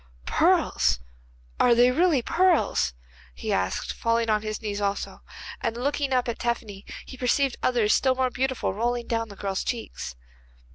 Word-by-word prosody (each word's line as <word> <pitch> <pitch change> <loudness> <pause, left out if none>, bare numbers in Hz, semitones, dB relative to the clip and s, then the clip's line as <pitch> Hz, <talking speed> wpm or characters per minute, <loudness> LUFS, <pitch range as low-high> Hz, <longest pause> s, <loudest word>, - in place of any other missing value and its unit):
'Pearls! 65 -1 +3 0.6
Are 240 -1 +5
they 245 +1 +5
really 315 -3 +3
pearls?' 335 - +2 0.4
he 65 - -3
asked, 95 0 -1
falling 230 -1 +1
on 210 0 +2
his 215 -1 -4
knees 205 -2 -4
also, 200 0 -2 0.4
and 230 0 -2
looking 280 +2 -1
up 250 -1 +2
at 235 - -3
Tephany 220 -4 -3 0.2
he 260 - -10
perceived 255 +1 +1
others 235 -4 +2
still 260 -1 +3
more 255 -1 +1
beautiful 260 -5 -1
rolling 240 +3 -1
down 230 -1 -2
the 200 - -10
girl's 195 -1 -2
cheeks. 230 - -5
235 Hz, 155 wpm, -26 LUFS, 210-255 Hz, 0.6 s, Are